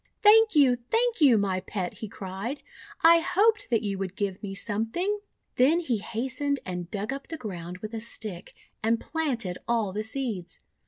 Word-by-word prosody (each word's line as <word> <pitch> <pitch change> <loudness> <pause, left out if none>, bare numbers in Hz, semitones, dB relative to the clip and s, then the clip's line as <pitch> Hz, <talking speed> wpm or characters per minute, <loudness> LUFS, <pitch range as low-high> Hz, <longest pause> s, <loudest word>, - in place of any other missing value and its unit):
4 415 - +10
Thank 445 -2 +5
you! 265 -4 +5
Thank 465 -3 +1
you, 265 -6 +7
my 195 -2 +1
Pet!" 185 -1 -5
he 220 - -5
cried. 195 +7 -6 0.4
"I 335 +1 +8
hoped 410 +5 +2
that 230 -2 +2
you 200 -2 -2
would 190 -1 -4
give 200 -2 -2
me 195 -2 -5
something!'1 230 - -1 0.4
Then 285 +7 +5
he 255 -10 -1
hastened 260 +6 -2
and 180 -2 -5
dug 210 +6 -3
up 275 0 -7
the 320 - -5
ground 180 - -6
with 215 +1 -5
a 225 - -3
stick, 215 -5 -4 0.3
and 225 +1 +2
planted 245 - -2
all 225 -5 +1
the 210 - -1
seeds. 220 -7 -4
225 Hz, 180 wpm, -27 LUFS, 195-290 Hz, 0.4 s, 4